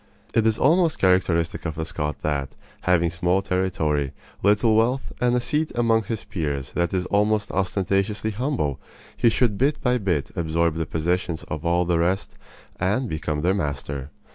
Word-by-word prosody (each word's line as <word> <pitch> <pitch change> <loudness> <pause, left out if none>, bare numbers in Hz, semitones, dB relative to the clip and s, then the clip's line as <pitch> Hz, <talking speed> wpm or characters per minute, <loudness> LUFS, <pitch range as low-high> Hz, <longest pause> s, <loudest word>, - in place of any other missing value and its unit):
It 115 -1 +3
is 110 -1 +2
almost 165 +3 +3
characteristic 90 -3 +2
of 80 -3 -3
the 80 0 -3
Scot 75 -3 -4
that, 70 -3 -2 0.3
having 85 -2 +3
small 90 +3 +1
territory, 80 -7 0 0.3
little 105 +2 +4
wealth, 120 +4 +1
and 125 0 +3
a - - +3
seat 150 +5 -1
among 115 -2 +2
his 110 0 -4
peers 70 -7 -3
that 85 -1 0
is 90 -1 -1
almost 105 +1 +1
ostentatiously 100 +3 0
humble, 110 - -1 0.4
he 120 - +4
should 110 -3 +1
bit 140 +3 +2
by 125 -1 +1
bit 90 -9 -1
absorb 85 0 +1
the 80 -1 -3
possessions 85 +1 -1
of 75 0 -4
all 85 +1 +2
the 85 -1 +1
rest 90 +4 0 0.5
and 105 +8 +1
become 75 -1 -2
their 90 +4 +2
master. 70 -5 -3
90 Hz, 165 wpm, -24 LUFS, 80-110 Hz, 0.5 s, little